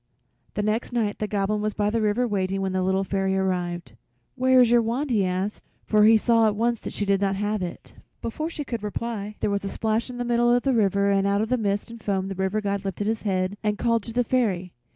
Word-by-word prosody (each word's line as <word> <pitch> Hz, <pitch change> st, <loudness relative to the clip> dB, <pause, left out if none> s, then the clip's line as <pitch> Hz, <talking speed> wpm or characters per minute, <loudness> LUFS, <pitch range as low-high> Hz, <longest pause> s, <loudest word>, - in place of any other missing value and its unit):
The 210 Hz, -, -1 dB
next 215 Hz, +4 st, -1 dB
night 215 Hz, -4 st, -1 dB
the 215 Hz, -, -1 dB
Goblin 210 Hz, +1 st, -1 dB
was 215 Hz, 0 st, -2 dB
by 205 Hz, 0 st, +1 dB
the 230 Hz, 0 st, 0 dB
river 215 Hz, +4 st, +1 dB
waiting 195 Hz, -2 st, -1 dB
when 190 Hz, -1 st, -1 dB
the 185 Hz, 0 st, 0 dB
Little 190 Hz, +1 st, +1 dB
Fairy 195 Hz, 0 st, 0 dB
arrived. 180 Hz, -2 st, -2 dB, 0.4 s
"Where 260 Hz, 0 st, +4 dB
is 245 Hz, -2 st, +5 dB
your 240 Hz, -1 st, +6 dB
wand?" 250 Hz, +5 st, -2 dB
he 210 Hz, -4 st, +3 dB
asked, 185 Hz, +3 st, -2 dB, 0.2 s
for 210 Hz, -1 st, +4 dB
he 220 Hz, +1 st, +7 dB
saw 230 Hz, 0 st, +3 dB
at 210 Hz, -, 0 dB
once 235 Hz, +1 st, 0 dB
she 205 Hz, -, -3 dB
did 200 Hz, 0 st, +2 dB
not 195 Hz, -1 st, +1 dB
have 210 Hz, +1 st, -1 dB
it. 175 Hz, -1 st, -7 dB, 0.3 s
Before 310 Hz, +8 st, -3 dB
she 310 Hz, -3 st, -5 dB
could 235 Hz, -3 st, -4 dB
reply 210 Hz, 0 st, -4 dB
there -, -, +1 dB
was 200 Hz, 0 st, 0 dB
splash 220 Hz, +4 st, -1 dB
in 250 Hz, -, -7 dB
the 245 Hz, -, -2 dB
middle 240 Hz, 0 st, +3 dB
of 245 Hz, 0 st, +3 dB
the 270 Hz, -, +2 dB
river 200 Hz, -3 st, +2 dB
and 195 Hz, 0 st, +2 dB
out 200 Hz, +1 st, +2 dB
of 220 Hz, -, -2 dB
the 255 Hz, -, +3 dB
mist 205 Hz, +1 st, -1 dB
and 230 Hz, -1 st, -10 dB
foam 195 Hz, -2 st, -1 dB
the -, -, -3 dB
River 190 Hz, +3 st, -1 dB
God 200 Hz, -1 st, -2 dB
lifted 195 Hz, +1 st, -3 dB
his 220 Hz, +1 st, -1 dB
head 190 Hz, -1 st, -1 dB
and 210 Hz, -1 st, 0 dB
called 230 Hz, 0 st, +1 dB
to 230 Hz, -, -8 dB
the 245 Hz, +2 st, +1 dB
Fairy. 200 Hz, -8 st, 0 dB
210 Hz, 250 wpm, -25 LUFS, 195-230 Hz, 0.4 s, he